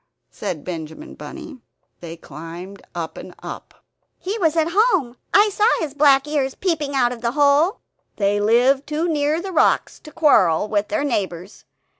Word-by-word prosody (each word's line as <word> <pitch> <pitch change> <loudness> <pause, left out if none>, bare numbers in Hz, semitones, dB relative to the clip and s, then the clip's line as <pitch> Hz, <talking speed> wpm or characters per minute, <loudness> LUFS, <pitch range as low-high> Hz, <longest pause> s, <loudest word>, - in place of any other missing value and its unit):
said 180 -8 -5
Benjamin 170 - -7
Bunny. 270 - -10 0.4
They 170 -1 -8
climbed 165 +6 -10
up 165 -2 -5
and - - -10
up; - - -9 0.3
"He 390 +3 -4
was 325 -4 +2
at 325 +1 +2
home; 380 - +2 0.2
I 415 +1 +5
saw 420 +2 +2
his 310 -4 -4
black 285 -1 +4
ears 280 -3 -1
peeping 305 -6 -2
out 245 -2 +2
of 235 - -10
the 235 0 -1
hole." 290 - +3 0.3
"They 205 0 +1
live 245 +6 +3
too 305 +3 -1
near 300 0 0
the 380 +2 -6
rocks 340 - +2
to 305 - -13
quarrel 205 - +3
with 210 -1 0
their 310 -2 -1
neighbors. 195 - -3
275 Hz, 165 wpm, -21 LUFS, 200-315 Hz, 0.4 s, I